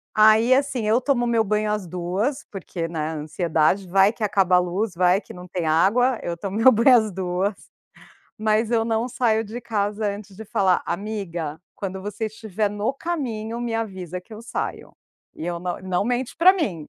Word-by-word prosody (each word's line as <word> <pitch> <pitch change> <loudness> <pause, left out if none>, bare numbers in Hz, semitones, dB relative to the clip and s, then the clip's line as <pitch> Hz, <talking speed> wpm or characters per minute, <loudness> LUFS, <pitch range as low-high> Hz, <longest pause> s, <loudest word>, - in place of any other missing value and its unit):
Aí, 220 +3 +6
assim: 260 -4 0
Eu 230 +4 +3
tomo 245 -3 +1
meu 230 -2 +2
banho 210 +1 0
às 210 -4 -2
14h, 185 - -2
porque, 180 -3 -5
né, 165 -1 -5
a 155 +1 -2
ansiedade. 160 +4 0
Vai 195 +4 +4
que 225 - -6
acaba 195 -3 +3
a - - +6
luz, 180 +4 -1
vai 180 +2 +3
que - - -12
não 180 0 -10
tem 175 -1 -3
água. 215 +11 +3
Eu 170 0 -4
tomo 195 +3 -4
meu 230 +4 +7
banho 245 +3 +6
às 215 -2 0
14h, 185 +2 -1 0.8
mas 215 +1 +1
eu 230 -2 +2
não 225 +1 0
saio 230 -3 +1
de 225 +3 -7
casa 210 -2 -1
antes 200 -1 -5
de 220 +3 -9
falar: 195 -5 +2
"Amiga, 175 -7 -4
quando 190 -1 -5
você 205 +3 -4
estiver 215 -1 -3
no 210 +4 -1
caminho, 240 -9 -3
me 240 -1 -2
avisa 190 -6 -4
que 200 +5 -18
eu 215 - -8
saio". 230 - -5 0.4
E 160 - -7
eu 175 -1 -3
não 180 0 -3
não 185 0 0
mente 245 +2 -1
para 365 +3 +6
mim! 190 - -3
210 Hz, 195 wpm, -23 LUFS, 180-225 Hz, 0.8 s, meu